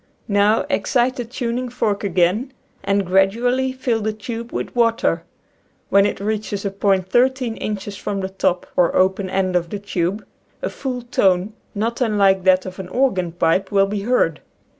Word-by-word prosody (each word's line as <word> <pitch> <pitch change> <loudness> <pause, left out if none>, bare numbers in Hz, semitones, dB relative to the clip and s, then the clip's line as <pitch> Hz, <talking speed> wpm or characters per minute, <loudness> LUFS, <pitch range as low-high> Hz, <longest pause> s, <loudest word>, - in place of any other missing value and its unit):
Now, 205 +1 +3
excite 255 -3 +1
the 245 - -3
tuning 245 +1 -3
fork 215 -4 -1
again 195 +7 +1 0.3
and 200 0 +1
gradu 195 +6 +2
ally 260 +1 +1
fill 250 -3 -1
the 215 +1 0
tube 230 +2 -6
with - - -4
water. 230 -1 +1 0.6
When 200 +1 +5
it - - -4
reaches 210 -1 -3
a 200 - -1
point 195 -2 +1
thirteen 250 -1 +2
inches 205 -1 -4
from 200 -1 -3
the 190 - -3
top, 185 -2 0
or 175 -2 +3
open 190 +1 +2
end, 185 -1 0
of 170 -1 0
the 205 - -4
tube, 200 0 -2 0.4
a - - -1
full 250 -3 -4
tone, 195 -3 +1 0.2
not 230 +4 -2
unlike 200 -5 +3
that 185 0 +4
of 185 0 -8
an 190 - -5
organ 185 -5 0
pipe, 175 +3 +1
will 195 -1 +4
be 205 +1 -3
heard. 205 -8 +1
205 Hz, 175 wpm, -20 LUFS, 190-235 Hz, 0.6 s, When